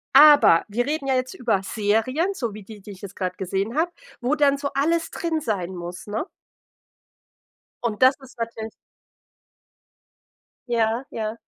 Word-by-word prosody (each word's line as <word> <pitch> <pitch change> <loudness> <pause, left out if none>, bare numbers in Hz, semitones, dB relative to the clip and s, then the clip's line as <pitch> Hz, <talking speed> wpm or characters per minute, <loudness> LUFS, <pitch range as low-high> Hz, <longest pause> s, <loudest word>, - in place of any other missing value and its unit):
Aber 290 - +8
wir 240 +4 -1
reden 295 -2 -2
ja 265 - +2
jetzt 255 0 -2
über 225 -6 0
Serien, 225 - 0
so 235 - -3
wie 210 -1 -9
die, 210 0 -12
die 205 +1 -10
ich 190 - -12
jetzt 200 -1 -9
gerade 185 -1 -3
gesehen 195 - -2
habe, 345 +2 +1 0.3
wo 260 +5 +1
dann 285 -2 +3
so 280 0 -3
alles 330 +4 +1
drin 330 -2 -2
sein 190 - -3
muss, 175 +2 -7
ne? 215 +9 -2 1.6
Und 225 -2 -2
das 260 +1 +7
ist 265 -2 -16
natür 230 -1 -4 2.0
Ja, 230 +2 +1
ja. 220 0 -4
230 Hz, 155 wpm, -24 LUFS, 205-280 Hz, 2.0 s, Aber